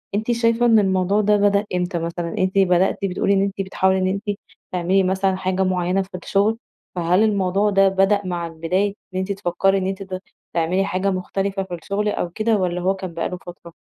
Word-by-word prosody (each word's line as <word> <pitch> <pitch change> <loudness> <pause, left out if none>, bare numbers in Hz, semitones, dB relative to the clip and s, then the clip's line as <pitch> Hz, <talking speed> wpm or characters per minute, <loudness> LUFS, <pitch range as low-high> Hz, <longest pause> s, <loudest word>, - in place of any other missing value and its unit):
أنتِ 220 +3 0
شايفة 230 0 +2
إن 225 -2 +6
الموضوع 190 +1 +2
ده 210 0 +3
بدأ 200 0 +2
إمتى 180 -1 -1
مثلًا؟ 170 0 -4
أنتِ 185 +1 0
بدأتِ 185 -1 +3
بتقولي 195 +1 +1
إن 195 - +3
أنتِ 195 0 -1
بتحاولي 190 0 +1
إن 185 - +1
أنتِ 200 +1 -2 0.3
تعملي 185 +2 +2
مثلًا 190 0 +1
حاجة 185 0 -1
معينة 185 0 +1
في 190 -1 -7
الشغل، 205 +3 +1 0.4
فهل 180 +3 +2
الموضوع 200 -1 +2
ده 195 -1 +4
بدأ 195 +2 +2
مع 175 -2 -3
البداية 180 +5 -1 0.2
إن 185 - -1
أنتِ 190 +1 -2
تفكري 195 0 +1
إن 185 - -1
أنتِ 195 +1 -4
ت 185 -1 -6 0.3
تعملي 175 +3 +1
حاجة 195 +1 0
مختلفة 195 +1 -2
في 190 - -9
الشغل 200 +5 -2
أو 175 - -2
كده 215 +5 0
والّا 180 -2 -1
هو 190 +2 +2
كان 185 -3 -7
بقى 165 - -2
له 180 - -5
فترة؟ 175 -2 -12
190 Hz, 205 wpm, -21 LUFS, 180-200 Hz, 0.4 s, إن